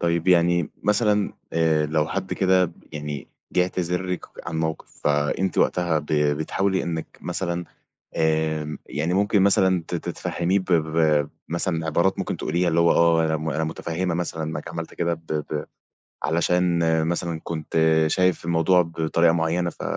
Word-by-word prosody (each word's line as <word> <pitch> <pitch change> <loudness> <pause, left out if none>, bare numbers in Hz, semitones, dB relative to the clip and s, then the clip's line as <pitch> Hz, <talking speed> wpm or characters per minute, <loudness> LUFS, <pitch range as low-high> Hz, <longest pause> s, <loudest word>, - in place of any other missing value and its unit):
طيب 85 +1 0
يعني 85 -2 +3
مثلًا 105 -1 +2 0.2
آآ، 80 -2 +2
لو 75 0 +1
حد 95 -1 -3
كده 95 -2 +2 0.2
يعني 75 -2 -5 0.2
ب - - -21
جِه 90 - +6
اعتذرلِك 90 0 -2
ك - - -10
عن 80 - -4
موقِف 80 0 -4
فأنتِ 75 +5 +1
وقتها 85 -3 +2
ب 75 - -9
بتحاولي 80 +6 +1
إنِّك 80 -2 -5
مثلًا 85 -1 -3 0.5
آمم، 80 -1 0
يعني 75 +6 -2
ممكن 100 +1 +3
مثلًا 95 -2 +3
ت - - -3
تفهميه 90 +3 -1
ب - - -5
ب 80 -2 +1
ب 75 -2 +3 0.2
مثلًا، 85 -1 -1
عبارات 85 +5 +1
ممكن - - -2
تقوليها 85 +3 0
اللي 85 0 +2
هو 85 0 +5
آه 85 -1 +4
أنا 80 0 0
م 80 +1 -3
أنا 80 +1 -1
متفهمة 85 +2 -2
مثلًا 85 -1 -3
إنّك 80 0 -4
عملت - - -6
كده 85 0 0
ب 80 0 -10
ب 75 -2 -3 0.6
علشان 85 +1 +2 0.3
مثلًا 85 -1 -2
كنت 80 -1 -4 0.3
شايف 90 +1 +1
الموضوع 85 +2 +3
بطريقة 85 0 +1
معيّنة 85 +1 0
ف - - -10
85 Hz, 160 wpm, -24 LUFS, 80-90 Hz, 0.6 s, جِه